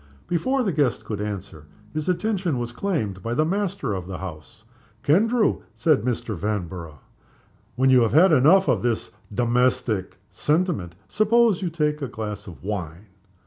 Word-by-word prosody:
Before 255 Hz, +11 st, +1 dB
the 200 Hz, -, 0 dB
guest 145 Hz, -6 st, 0 dB
could 105 Hz, -2 st, -4 dB
answer, 95 Hz, -7 st, -6 dB, 0.3 s
his 155 Hz, +2 st, -2 dB
attention 185 Hz, -, 0 dB
was 120 Hz, -1 st, -3 dB
claimed 120 Hz, -, -2 dB
by 115 Hz, +5 st, -3 dB
the 155 Hz, -, +2 dB
master 195 Hz, -, -1 dB
of 90 Hz, -2 st, -5 dB
the 95 Hz, -, -5 dB
house. 90 Hz, +2 st, -9 dB, 0.4 s
"Kendrew," 215 Hz, -, +3 dB
said 155 Hz, -4 st, +3 dB
Mr. 115 Hz, -2 st, -2 dB
Vanborough, 90 Hz, -6 st, -4 dB, 0.7 s
"when 130 Hz, +2 st, +3 dB
you 130 Hz, -1 st, +6 dB
have 115 Hz, -, +1 dB
had 175 Hz, +5 st, +6 dB
enough 155 Hz, +7 st, +5 dB
of 120 Hz, -2 st, +1 dB, 0.3 s
domestic 120 Hz, -4 st, 0 dB
sentiment, 150 Hz, -, 0 dB
suppose 215 Hz, -2 st, +3 dB
you 180 Hz, -, -1 dB
take 150 Hz, -2 st, -1 dB
a 140 Hz, -, -2 dB
glass 105 Hz, -4 st, -6 dB
of 85 Hz, -3 st, -11 dB
wine?" 95 Hz, -1 st, -5 dB
125 Hz, 150 wpm, -24 LUFS, -, 0.7 s, you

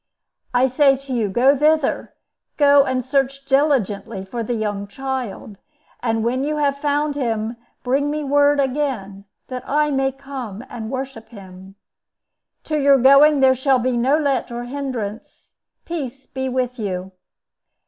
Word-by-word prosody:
I 250 Hz, +1 st, +3 dB
say 270 Hz, +1 st, +3 dB
to 270 Hz, 0 st, -7 dB
you, 225 Hz, -4 st, 0 dB
go 255 Hz, +8 st, +4 dB
thither; 305 Hz, 0 st, +1 dB, 0.4 s
go 285 Hz, -1 st, +6 dB
and 255 Hz, -2 st, -1 dB
search 275 Hz, 0 st, -1 dB
diligently 265 Hz, -9 st, 0 dB
for 230 Hz, +5 st, -5 dB
the 235 Hz, +2 st, -2 dB
young 205 Hz, -2 st, -3 dB
child; 245 Hz, -4 st, -5 dB, 0.4 s
and 225 Hz, -2 st, 0 dB
when 255 Hz, +3 st, 0 dB
you 300 Hz, +1 st, -1 dB
have 285 Hz, -2 st, +1 dB
found 290 Hz, 0 st, 0 dB
him 230 Hz, -4 st, -2 dB, 0.3 s
bring 275 Hz, +3 st, +1 dB
me 300 Hz, 0 st, -2 dB
word 285 Hz, +1 st, +3 dB
again, 255 Hz, -8 st, -2 dB, 0.2 s
that 255 Hz, -1 st, -5 dB
I 300 Hz, +1 st, +1 dB
may 270 Hz, -1 st, +1 dB
come 260 Hz, -5 st, -8 dB
and 220 Hz, -2 st, -6 dB
worship 260 Hz, -4 st, -6 dB
him. 190 Hz, -3 st, -13 dB, 0.9 s
To 305 Hz, -1 st, -1 dB
your 280 Hz, -1 st, +5 dB
going 275 Hz, +3 st, +6 dB
there 260 Hz, -1 st, +6 dB
shall 260 Hz, +1 st, +2 dB
be 250 Hz, 0 st, 0 dB
no 260 Hz, +5 st, +2 dB
let 280 Hz, -6 st, -1 dB
or 240 Hz, 0 st, -4 dB
hindrance. 245 Hz, -5 st, -6 dB, 0.3 s
Peace 275 Hz, -6 st, -5 dB
be 265 Hz, 0 st, -4 dB
with 250 Hz, -1 st, -2 dB
you!" 190 Hz, -3 st, -4 dB
260 Hz, 150 wpm, -21 LUFS, 230-280 Hz, 0.9 s, go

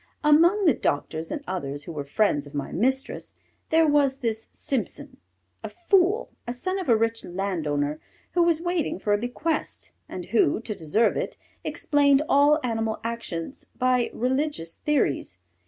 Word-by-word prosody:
Among 335 Hz, +7 st, +5 dB
the 315 Hz, -, +6 dB
doctors 160 Hz, -2 st, -2 dB
and 290 Hz, -, -4 dB
others 145 Hz, -6 st, -3 dB
who 170 Hz, -, -7 dB
were 150 Hz, -3 st, -4 dB
friends 145 Hz, -1 st, +1 dB
of 145 Hz, -, -12 dB
my 140 Hz, -, -3 dB
mistress, 265 Hz, +7 st, -1 dB, 0.3 s
there 320 Hz, 0 st, +4 dB
was 285 Hz, -2 st, +3 dB
this 225 Hz, -2 st, -2 dB
Simpson, 265 Hz, -, -4 dB, 0.5 s
a -, -, -4 dB
fool, 380 Hz, -, +2 dB, 0.2 s
a 240 Hz, -, -2 dB
son 370 Hz, +10 st, -2 dB
of 365 Hz, -, -4 dB
a 230 Hz, -, +6 dB
rich 225 Hz, 0 st, 0 dB
landowner, 155 Hz, -6 st, -2 dB, 0.3 s
who 355 Hz, -, +2 dB
was 340 Hz, -2 st, +3 dB
waiting 345 Hz, -, -1 dB
for 205 Hz, +2 st, 0 dB
a 205 Hz, -, +2 dB
bequest, 290 Hz, +7 st, -3 dB, 0.2 s
and 180 Hz, -, -6 dB
who, 215 Hz, -8 st, +3 dB
to 225 Hz, -, -4 dB
deserve 185 Hz, +6 st, +1 dB
it, -, -, -3 dB, 0.3 s
explained 285 Hz, -1 st, +3 dB
all 290 Hz, +2 st, +5 dB
animal 225 Hz, -2 st, -1 dB
actions 230 Hz, -, -5 dB
by 250 Hz, -1 st, +2 dB
religious 260 Hz, -, -1 dB
theories. 255 Hz, -, 0 dB
240 Hz, 155 wpm, -25 LUFS, 180-300 Hz, 0.5 s, the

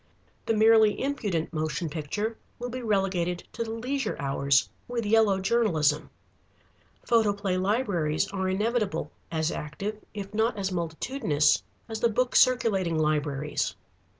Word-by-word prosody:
The 225 Hz, -, +2 dB
merely 220 Hz, -1 st, +5 dB
impudent 210 Hz, -, -2 dB
motion 155 Hz, +1 st, -2 dB
picture 170 Hz, +9 st, -3 dB, 0.2 s
will 245 Hz, 0 st, -5 dB
be 255 Hz, +1 st, -4 dB
relegated 190 Hz, -5 st, 0 dB
to 230 Hz, -, -2 dB
the 225 Hz, -, -7 dB
leisure 245 Hz, +2 st, -2 dB
hours 140 Hz, 0 st, +2 dB, 0.2 s
with 235 Hz, -2 st, -2 dB
yellow 210 Hz, -2 st, +4 dB
journalism. 190 Hz, -8 st, +1 dB, 0.9 s
Photoplay 205 Hz, -4 st, +2 dB
libraries 185 Hz, -6 st, 0 dB
are 190 Hz, -1 st, -1 dB
inevitable, 205 Hz, -5 st, -1 dB, 0.2 s
as 160 Hz, 0 st, 0 dB
active 200 Hz, +8 st, -5 dB
if 200 Hz, 0 st, -6 dB
not 220 Hz, +1 st, +1 dB
as 195 Hz, -1 st, -2 dB
multitudinous 165 Hz, -, +1 dB, 0.3 s
as 220 Hz, -1 st, -5 dB
the 235 Hz, -, +3 dB
book 250 Hz, +3 st, 0 dB
circulating 200 Hz, -9 st, +3 dB
libraries. 150 Hz, -1 st, 0 dB
200 Hz, 125 wpm, -27 LUFS, 160-225 Hz, 0.9 s, merely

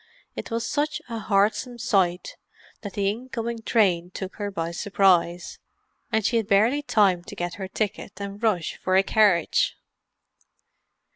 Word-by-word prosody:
It -, -, -6 dB
was 230 Hz, -1 st, -2 dB
such 300 Hz, +1 st, -1 dB
a 230 Hz, -1 st, -4 dB
heartsome 215 Hz, +4 st, +1 dB
sight 190 Hz, -7 st, 0 dB, 0.5 s
that 205 Hz, -, -7 dB
the 200 Hz, -1 st, 0 dB
incoming 230 Hz, +1 st, -3 dB
train 185 Hz, -7 st, +2 dB
took 190 Hz, +1 st, -7 dB
her 205 Hz, -1 st, -3 dB
by 165 Hz, -4 st, -3 dB
surprise, 175 Hz, -2 st, +1 dB, 0.5 s
and 220 Hz, -2 st, +1 dB
she 235 Hz, -, +2 dB
had 220 Hz, -3 st, -1 dB
barely 220 Hz, +9 st, +3 dB
time 200 Hz, -10 st, +2 dB
to -, -, -9 dB
get 175 Hz, 0 st, -3 dB
her 190 Hz, -, -3 dB
ticket 200 Hz, -1 st, -4 dB
and 200 Hz, 0 st, -6 dB
rush 205 Hz, -8 st, 0 dB
for 185 Hz, -, 0 dB
a 190 Hz, -, +5 dB
carriage. 200 Hz, -4 st, +2 dB
200 Hz, 150 wpm, -25 LUFS, 185-225 Hz, 0.5 s, a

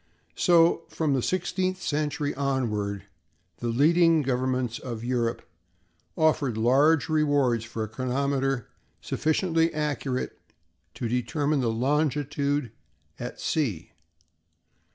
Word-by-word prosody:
So, 170 Hz, -2 st, +4 dB
from 155 Hz, -3 st, 0 dB
the 130 Hz, -, +1 dB
sixteenth 185 Hz, +3 st, -1 dB
century 150 Hz, -2 st, -1 dB
onward, 110 Hz, -8 st, -1 dB, 0.5 s
the 120 Hz, -, -4 dB
leading 160 Hz, +6 st, +4 dB
governments 130 Hz, -2 st, -1 dB
of 115 Hz, -3 st, -6 dB
Europe 120 Hz, -1 st, -1 dB, 0.7 s
offered 150 Hz, -7 st, +2 dB
large 135 Hz, +6 st, +4 dB
rewards 145 Hz, -7 st, +2 dB
for 115 Hz, -1 st, -4 dB
a -, -, -3 dB
chronometer 135 Hz, +2 st, -1 dB, 0.3 s
sufficiently 165 Hz, +1 st, +1 dB
accurate 145 Hz, -4 st, -3 dB, 0.6 s
to 120 Hz, -, -3 dB
determine 135 Hz, +5 st, 0 dB
longitude 140 Hz, +2 st, 0 dB, 0.5 s
at -, -, -6 dB
sea. 110 Hz, -, -1 dB
140 Hz, 95 wpm, -26 LUFS, 120-155 Hz, 0.7 s, So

